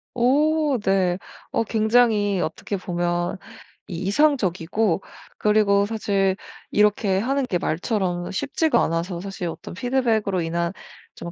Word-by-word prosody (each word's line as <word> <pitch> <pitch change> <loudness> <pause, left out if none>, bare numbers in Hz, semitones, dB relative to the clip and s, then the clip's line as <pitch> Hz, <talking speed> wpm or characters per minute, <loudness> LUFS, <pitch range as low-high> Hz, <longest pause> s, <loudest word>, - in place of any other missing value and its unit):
오 295 +3 +2
네. 185 -2 +2 0.3
어 - - +1
굉장히 220 -3 +2
어떻게 195 +5 -3
보면 175 0 -2 0.5
이 180 - -6
이상적이고 200 - +1 0.4
그리고 210 -1 +3
사실 200 -3 0 0.4
이렇게 205 -2 +3
하는 270 +5 0
게 190 -8 0
말처럼 175 0 -1
쉽지가 290 - +1
않아서 170 +2 -2
사실 195 -2 -5
어떤 165 - -7
피드백으로 220 -4 0
인한 170 +1 -1 0.4
좀 170 - -7
200 Hz, 260 characters per minute, -23 LUFS, 175-230 Hz, 0.5 s, 그리고